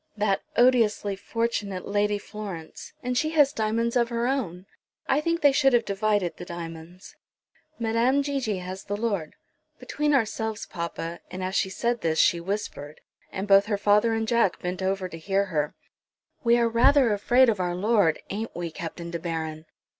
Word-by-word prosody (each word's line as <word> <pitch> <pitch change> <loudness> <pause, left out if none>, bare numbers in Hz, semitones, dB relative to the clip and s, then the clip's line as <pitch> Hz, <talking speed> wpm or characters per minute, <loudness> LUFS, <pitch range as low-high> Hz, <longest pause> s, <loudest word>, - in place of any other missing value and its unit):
"That 205 -2 +1 0.2
odiously 230 -5 +3
fortunate 205 -3 -3
Lady 205 0 +1
Florence; 200 -6 -8
and 250 0 -1
she 310 +5 +1
has 295 -3 +4
diamonds 230 +2 0
of 235 -1 +2
her 235 0 -1
own! 205 -9 -2 0.4
I 275 +3 +2
think 335 +2 -1
they 285 - +6
should 270 -1 +3
have 235 -1 +3
divided 205 -3 0
the - - -7
diamonds. 170 +1 -9 0.6
Madame 235 +5 +2
Gigi 270 -8 -1
has 185 +1 -7
the 205 +1 -3
Lord. 205 -8 -2 0.4
Between 295 -1 0
ourselves, 220 -3 -1
papa," 170 0 -5
and 185 0 -6
as 185 +1 -3
she 190 - +1
said 235 +4 -1
this 160 -1 0
she 170 - +4
whispered, 170 -6 -5 0.3
and 195 +2 -4
both 200 0 +6
her 210 -2 0
father 210 +3 +3
and 225 0 -1
Jack 235 -5 +2
bent 180 +1 -4
over 190 0 -1
to 165 -2 -9
hear 195 +3 0
her 150 0 -1 0.7
"we 235 0 +4
are 235 -1 +3
rather 235 +1 +4
afraid 245 +5 +4
of 215 -4 +1
our 175 -1 -1
Lord; 200 -4 +2
ain't 220 +3 -4
we, 170 -1 -4
Captain 170 +1 -7
De 170 - -3
Baron? 160 -2 -4
205 Hz, 175 wpm, -26 LUFS, 180-235 Hz, 0.7 s, they